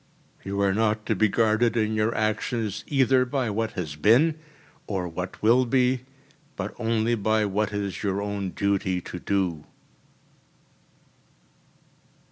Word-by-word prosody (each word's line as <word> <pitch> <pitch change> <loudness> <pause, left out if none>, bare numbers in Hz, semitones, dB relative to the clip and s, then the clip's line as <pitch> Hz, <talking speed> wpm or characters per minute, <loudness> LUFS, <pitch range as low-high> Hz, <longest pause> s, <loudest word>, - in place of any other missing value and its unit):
You 100 +1 -3
are 100 -1 +2
not 110 0 0
to 110 - 0
be 105 +2 +3
guarded 115 +2 +2
in 110 -1 +1
your 110 +1 0
actions 110 0 -1
either 130 -2 +3
by 125 -3 -1
what 110 +2 -2
has 80 -5 -4
been 130 - +4 0.5
or 95 -4 -2
what 90 +2 -6
will 120 +4 +5
be, 125 0 +1 0.5
but - - -4
only 115 0 +1
by 110 0 +1
what 105 +1 -1
it 105 0 -2
is 100 -4 -4
your 100 -1 -1
own 100 -1 -3
duty 95 -1 0
to 90 - -7
do. 90 -5 -1
110 Hz, 140 wpm, -25 LUFS, 100-115 Hz, 0.5 s, will